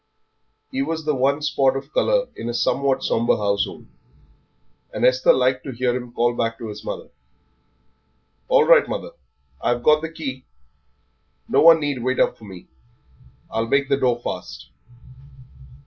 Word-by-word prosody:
He 265 Hz, 0 st, -2 dB
was 165 Hz, -, -3 dB
the 150 Hz, -, +1 dB
one 140 Hz, +3 st, 0 dB
spot 140 Hz, -3 st, +2 dB
of 140 Hz, +2 st, -9 dB
colour -, -, +1 dB
in 115 Hz, -, -5 dB
a 120 Hz, -, -3 dB
somewhat 135 Hz, +1 st, 0 dB
sombre 115 Hz, +1 st, +1 dB
household, 100 Hz, -1 st, -2 dB, 1.1 s
and -, -, -1 dB
Esther 130 Hz, 0 st, +4 dB
liked 130 Hz, 0 st, +1 dB
to 135 Hz, -, -5 dB
hear 125 Hz, 0 st, -1 dB
him 125 Hz, -1 st, -6 dB
call 120 Hz, 0 st, +1 dB
back 115 Hz, -1 st, -2 dB
to 115 Hz, -, -7 dB
his 105 Hz, 0 st, -9 dB
mother, -, -, -6 dB, 1.4 s
"All -, -, +4 dB
right, -, -, +5 dB
mother, -, -, -5 dB, 0.5 s
I've 120 Hz, 0 st, -1 dB
got 155 Hz, +2 st, +4 dB
the 160 Hz, -, -4 dB
key; 135 Hz, -5 st, -6 dB, 1.0 s
no -, -, +2 dB
one 165 Hz, 0 st, +8 dB
need 145 Hz, -4 st, -2 dB
wait 130 Hz, 0 st, -1 dB
up -, -, +2 dB
for 110 Hz, -, -13 dB
me. 95 Hz, -3 st, -11 dB, 0.9 s
I'll 115 Hz, +1 st, -1 dB
make 140 Hz, +2 st, +1 dB
the 140 Hz, -, +2 dB
door 125 Hz, -3 st, +1 dB
fast." 65 Hz, -, -7 dB
130 Hz, 160 wpm, -22 LUFS, 120-145 Hz, 1.4 s, one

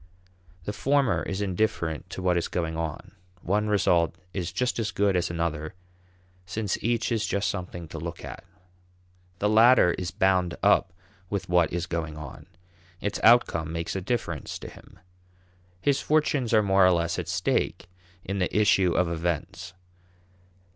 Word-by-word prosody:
The 105 Hz, -, -4 dB
former 135 Hz, 0 st, +2 dB
is 95 Hz, +1 st, -3 dB
indifferent 90 Hz, -5 st, -1 dB
to 95 Hz, -, -6 dB
what 90 Hz, -1 st, +2 dB
is 85 Hz, -, 0 dB
going 80 Hz, -2 st, -2 dB
on; 80 Hz, -2 st, -5 dB, 0.3 s
one 105 Hz, +4 st, +1 dB
result 85 Hz, -5 st, +2 dB, 0.2 s
is 90 Hz, -3 st, -3 dB
just 125 Hz, -1 st, -1 dB
as 110 Hz, -2 st, -1 dB
good 100 Hz, -1 st, +1 dB
as 90 Hz, -, 0 dB
another, 85 Hz, 0 st, -3 dB, 0.7 s
since 100 Hz, +3 st, -3 dB
each 120 Hz, +1 st, 0 dB
is 110 Hz, -2 st, +1 dB
just 100 Hz, -1 st, 0 dB
something 90 Hz, -3 st, -5 dB
to 80 Hz, -, -7 dB
look 85 Hz, +1 st, -6 dB
at. -, -, -9 dB, 0.9 s
The 105 Hz, -, 0 dB
latter 110 Hz, -3 st, +6 dB
is 90 Hz, -1 st, -3 dB
bound 90 Hz, -3 st, +1 dB
up 100 Hz, -2 st, +4 dB, 0.4 s
with 100 Hz, -3 st, -3 dB
what 90 Hz, -2 st, +3 dB
is 85 Hz, 0 st, -2 dB
going 80 Hz, -3 st, -4 dB
on; 75 Hz, -4 st, -9 dB, 0.5 s
its 105 Hz, -, -3 dB
outcome 110 Hz, -9 st, +4 dB
makes 85 Hz, +2 st, -3 dB
a 95 Hz, -, -2 dB
difference 90 Hz, -, -3 dB
to -, -, -9 dB
him. -, -, -16 dB, 0.8 s
His 140 Hz, +7 st, +1 dB
fortunes 150 Hz, -5 st, +1 dB
are 110 Hz, -2 st, +4 dB
more 95 Hz, -1 st, +4 dB
or 90 Hz, -, +6 dB
less 85 Hz, 0 st, 0 dB
at -, -, -5 dB
stake 90 Hz, 0 st, -1 dB, 0.4 s
in 100 Hz, +1 st, -3 dB
the 90 Hz, +2 st, 0 dB
issue 100 Hz, -4 st, +4 dB
of 90 Hz, -, +2 dB
events. 85 Hz, +1 st, -3 dB
90 Hz, 160 wpm, -26 LUFS, 85-105 Hz, 0.9 s, latter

